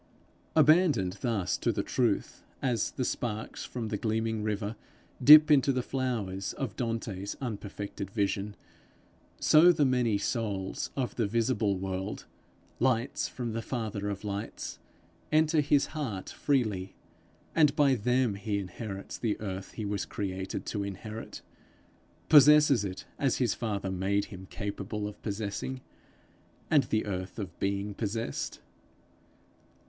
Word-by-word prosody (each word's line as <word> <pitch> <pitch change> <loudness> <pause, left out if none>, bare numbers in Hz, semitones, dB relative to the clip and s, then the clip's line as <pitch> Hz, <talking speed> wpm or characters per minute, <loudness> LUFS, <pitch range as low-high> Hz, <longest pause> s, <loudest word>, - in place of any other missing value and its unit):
Abandoned 150 - +4
thus 100 -8 0
to - - +1
the - - -2
truth, - - 0 0.2
as 125 -3 0
the 130 - -3
sparks 110 -3 -3
from 115 -3 -5
the 105 - -1
gleaming 110 0 -1
river 105 0 -2 0.5
dip 155 +1 +10
into 140 -2 +5
the 130 -2 -1
flowers 110 -9 -2
of 120 -7 -4
Dante's 110 -5 -3
unperfected 100 -5 -5
vision, 100 0 -1 0.8
so 165 +3 +7
the 150 -4 +2
many 125 -5 +2
souls 100 -3 -2
of 130 -3 -2
the 115 -4 +1
visible 110 -2 +1
world, 95 +2 -4 0.5
lights 120 -1 +1
from 120 -3 -5
the 115 - -2
father 110 -4 -3
of 100 0 -5
lights, 105 +1 -5 0.5
enter 155 0 +4
his 145 -1 +3
heart 120 - -4
freely; 105 -9 0 0.6
and 150 -3 +4
by 145 -3 +4
them 125 0 +1
he 100 +1 -2
inherits 100 +1 -6
the 110 -3 -1
earth 95 -2 -5
he 110 - -4
was 100 -2 -2
created 95 -2 -4
to 105 - -2
inherit 105 +3 -7 0.8
possesses 150 -4 +7
it 95 -2 -5
as 135 -3 +2
his 120 -5 +2
father 100 -4 -3
made 95 +2 0
him 95 0 -9
capable 105 +1 -4
of 105 - -10
possessing, 110 +5 -3 0.9
and 145 -4 +5
the 110 -2 0
earth 95 -1 -4
of 95 -6 -6
being 100 +1 -1
possessed. 105 -6 -3
110 Hz, 135 wpm, -29 LUFS, 100-125 Hz, 0.9 s, dip